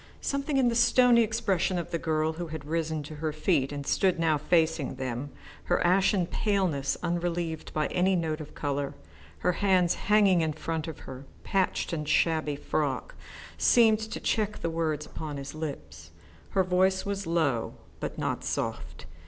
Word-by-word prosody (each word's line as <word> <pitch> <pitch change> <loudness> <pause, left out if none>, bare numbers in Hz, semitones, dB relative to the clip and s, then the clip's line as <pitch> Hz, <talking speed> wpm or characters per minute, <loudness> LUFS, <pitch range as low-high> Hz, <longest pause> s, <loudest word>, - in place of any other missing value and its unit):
Something 280 +1 -1
in 260 -2 +4
the 235 - +2
stony 240 0 +5
expression 200 -5 0
of 175 0 -4
the 170 - -1
girl 155 0 0
who 170 +1 -5
had 155 -2 -7
risen 160 -1 -2
to 150 +1 -9
her 155 0 -2
feet 155 -3 +1
and 145 -1 -5
stood 185 +3 +2
now 160 -2 +3
facing 160 -2 +1
them, 130 +1 -4 0.4
her 175 - +2
ashen 185 +1 +3
paleness 175 -8 0
unrelieved 170 -2 -2
by 155 -1 0
any 185 +1 +2
note 160 -2 -1
of 150 - -10
colour, 140 -1 -2 0.5
her 180 - +3
hands 180 -2 +3 0.2
hanging 200 -4 +5
in 160 -1 0
front 160 +1 -3
of 160 - -7
her 130 +1 -9 0.2
patched 190 -2 0
and 150 -2 -3
shabby 155 -3 +2
frock, 140 -3 -2 0.5
seemed 225 -3 +5
to 220 0 -5
check 210 -1 0
the 165 - -1
words 155 -2 -1
upon 150 -3 -6
his 140 0 -7
lips. 155 -2 -7 0.4
Her 190 - +2
voice 185 +1 +2
was 200 -2 -3
low 155 -9 0 0.2
but - - -5
not - - -2
soft. - - -4
165 Hz, 170 wpm, -28 LUFS, 155-190 Hz, 0.5 s, stony